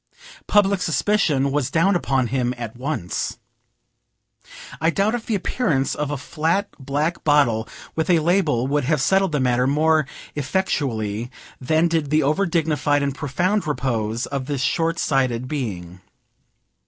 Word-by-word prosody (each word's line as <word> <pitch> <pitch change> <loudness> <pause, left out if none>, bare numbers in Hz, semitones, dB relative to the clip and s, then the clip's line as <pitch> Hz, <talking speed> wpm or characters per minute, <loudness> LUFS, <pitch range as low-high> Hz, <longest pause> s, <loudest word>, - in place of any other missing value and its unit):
Public 200 -2 +3
suspicion 160 -6 +1
was 140 -2 0
down 175 +6 +2
upon 135 -7 +1
him 125 0 -1
at 115 -2 -6
once. 125 - -3 1.4
I 160 - +3
doubt 200 +5 +1
if 240 -2 -4
the 225 - 0
appearance 165 - 0
of 150 -1 -3
a 145 - -2
flat 165 +8 -1
black 145 +5 -2
bottle 125 -7 +2 0.3
with 160 +1 -1
a 175 - +5
label 160 -7 +2
would 145 0 0
have 155 +1 +1
settled 190 +6 +2
the 150 - 0
matter 125 0 +2
more 155 +1 +2 0.3
effectually 125 - -1 0.3
than 155 +6 +2
did 165 -4 -1
the 155 +1 +3
over 155 +8 +1
dignified 150 -3 +1
and 140 -1 -1
profound 175 +8 -1
repose 115 -5 -1
of 135 -2 -4
this 145 -3 -2
short 165 +5 0
sighted 130 -3 0
being. 95 - -5
145 Hz, 145 wpm, -22 LUFS, 130-165 Hz, 1.4 s, a